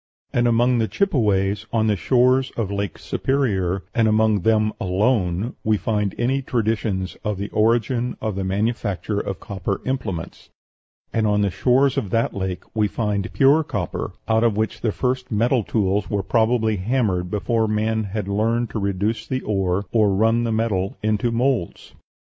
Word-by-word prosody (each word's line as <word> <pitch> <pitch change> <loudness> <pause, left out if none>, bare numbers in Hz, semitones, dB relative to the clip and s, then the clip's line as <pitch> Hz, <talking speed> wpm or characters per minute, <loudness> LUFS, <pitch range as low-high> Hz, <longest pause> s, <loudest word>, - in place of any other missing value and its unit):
And 120 0 +2
among 120 +1 +3
the 110 - +1
Chippeways 105 - +1
of 110 -1 +1
the 105 -1 +2
shores 130 +5 +3
of 105 -4 -1
Lake 100 -4 -3
Superior, 100 -9 -1
and 115 -2 +3
among 110 -1 +3
them 110 +2 +2
alone, 100 +1 0
we 110 -1 +2
find 105 -2 -1
any 130 +3 +1
traditions 110 -6 -1
of 105 -3 -2
the 100 +1 -4
origin 120 +3 +1
of 110 -2 -2
the 95 - -2
manufacture 100 0 -1
of 95 -2 -4
copper 100 -1 -4
implements; 110 -11 -4 0.6
and 110 -1 +1
on 105 0 +2
the 100 -2 +1
shores 135 +6 +2
of 105 - -5
that 115 +4 0
lake 95 -2 -3
we 105 -1 +2
find 105 -3 -2
pure 140 +4 +4
copper, 100 - -4
out 110 0 +2
of 115 -3 +2
which 110 -2 -2
the 110 - +1
first 125 +3 -2
metal 115 +3 +2
tools 100 -1 0
were 100 -2 -1
probably 110 +1 +2
hammered 95 -4 0
before 110 +3 0
man 110 +1 0
had 100 0 -4
learned 115 +4 0
to 110 - -3
reduce 100 +3 -1
the 130 0 -2
ore 95 -1 -1
or 105 -4 +3
run 115 +3 +2
the 115 - -1
metal 105 -4 -1
into 110 +2 +1
moulds. 120 -5 -1
110 Hz, 165 wpm, -22 LUFS, 100-120 Hz, 0.6 s, pure